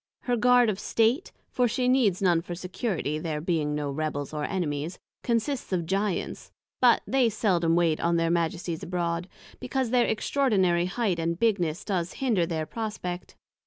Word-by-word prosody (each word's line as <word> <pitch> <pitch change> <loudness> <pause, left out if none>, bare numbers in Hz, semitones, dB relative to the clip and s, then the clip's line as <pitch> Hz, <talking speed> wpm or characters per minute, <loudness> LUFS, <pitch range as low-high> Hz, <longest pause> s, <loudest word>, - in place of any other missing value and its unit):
Her 245 - 0
Guard 245 0 +5
of 190 - -6
State 230 - +1 0.2
(for 250 -1 +2
she 250 +2 0
needs 230 -8 +3
none 175 -3 +4
for 175 0 -6
security, 180 - -3
there 155 -2 -3
being 155 -2 -1
no 145 -1 -2
Rebels 145 0 -3
or 150 -1 -2
Enemies) 160 -3 -2 0.2
consists 245 +2 -1
of 175 -3 0
Giants, 195 +2 -2 0.3
but 245 -2 +5
they 260 -3 +3
seldom 180 -6 +1
wait 170 -3 +2
on 170 0 +1
their 165 0 +1
Majesties 170 0 -1
abroad, 170 0 -2 0.3
because 255 -1 -2
their 245 -1 +3
extraordinary 205 -7 +2
height 195 -3 -1
and 165 0 -1
bigness 180 -7 0
does 180 -3 -2
hinder 220 -11 +1
their 160 -2 -2
prospect. 205 -4 -5
180 Hz, 165 wpm, -27 LUFS, 165-230 Hz, 0.3 s, Guard